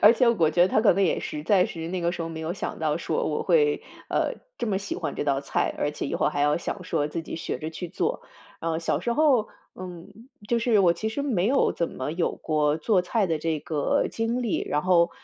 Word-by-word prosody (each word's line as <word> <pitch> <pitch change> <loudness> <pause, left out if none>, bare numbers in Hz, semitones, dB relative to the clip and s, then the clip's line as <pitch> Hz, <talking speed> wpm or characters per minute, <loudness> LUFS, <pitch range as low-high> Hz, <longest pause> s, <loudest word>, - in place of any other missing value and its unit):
而 210 +2 +9
且 240 0 +3
我 170 -9 +3
觉 175 +2 +4
得 180 - +4
她 210 - +3
可 215 - +5
能 195 +2 +1
也 175 - +1
实 150 - -5
在 185 +1 +4
是， 165 0 -6
那 185 0 -2
个 170 0 0
时 175 - -4
候 165 - -4
没 160 -1 -6
有 160 +2 -2
想 195 - -5
到 155 -1 0
说 170 - -1
我 - - -1
会， 445 -3 +3 0.3
呃， - - 0 0.2
这 - - -2
么 195 -3 0
喜 200 - -5
欢 150 -5 -3
这 - - -2
道 140 -1 +1
菜， 140 - -1
而 145 - 0
且 150 - -4
以 - - -3
后 - - +2
还 145 - -2
要 145 +1 +3
想 170 - -4
说 145 - 0
自 165 +2 -4
己 160 - -6
学 - - -4
着 155 +1 -5
去 175 +1 -6
做。 460 - -2 0.4
嗯， 165 0 -1
小 165 - 0
时 235 - -1
候， 265 -5 +3 0.3
嗯， 185 +6 -10 0.2
就 235 - +2
是 230 -2 +3
我 175 -3 +5
其 215 +6 -3
实 250 +6 -3
没 215 -10 +1
有 270 +4 +3
怎 170 - -1
么 130 +3 -4
有 170 +1 0
过 150 -1 +1
做 185 +2 +2
菜 200 +3 +1
的 160 -3 0
这 160 0 -1
个 150 -1 0
经 230 +2 -1
历， 225 - 0
然 150 - 0
后， 170 -1 +4
175 Hz, 275 characters per minute, -26 LUFS, 160-220 Hz, 0.4 s, 而